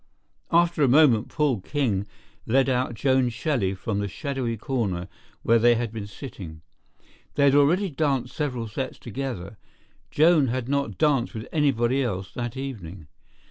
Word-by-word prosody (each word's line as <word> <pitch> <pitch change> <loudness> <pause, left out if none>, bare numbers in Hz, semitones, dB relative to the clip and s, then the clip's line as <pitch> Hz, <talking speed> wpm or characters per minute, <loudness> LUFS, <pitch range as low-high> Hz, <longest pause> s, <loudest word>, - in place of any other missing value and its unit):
After 170 -1 +3
a 140 - +5
moment 130 -4 +4
Paul 145 -7 +1
King 110 -7 -1 0.4
led 135 +3 +3
out 125 -1 0
Joan 130 +1 +2
Shelley 115 - -1
from 100 +2 -3
the 100 - -1
shadowy 130 - -3
corner 105 -8 -2 0.4
where 115 0 +4
they 120 +1 +5
had 115 -1 -2
been 110 -2 -6
sitting. 95 - -9 0.7
They 140 - +2
had 140 -1 +5
already 165 +7 +3
danced 135 -4 -1
several 125 -6 -2
sets 130 +5 -5
together; 115 -5 -6 0.5
Joan 155 -2 +4
had 125 0 -2
not 140 0 -1
danced 140 -6 +1
with 110 - -6
anybody 135 -4 +2
else 95 -7 -3
that 120 +1 -4
evening. 95 - -7
125 Hz, 150 wpm, -25 LUFS, 110-140 Hz, 0.7 s, a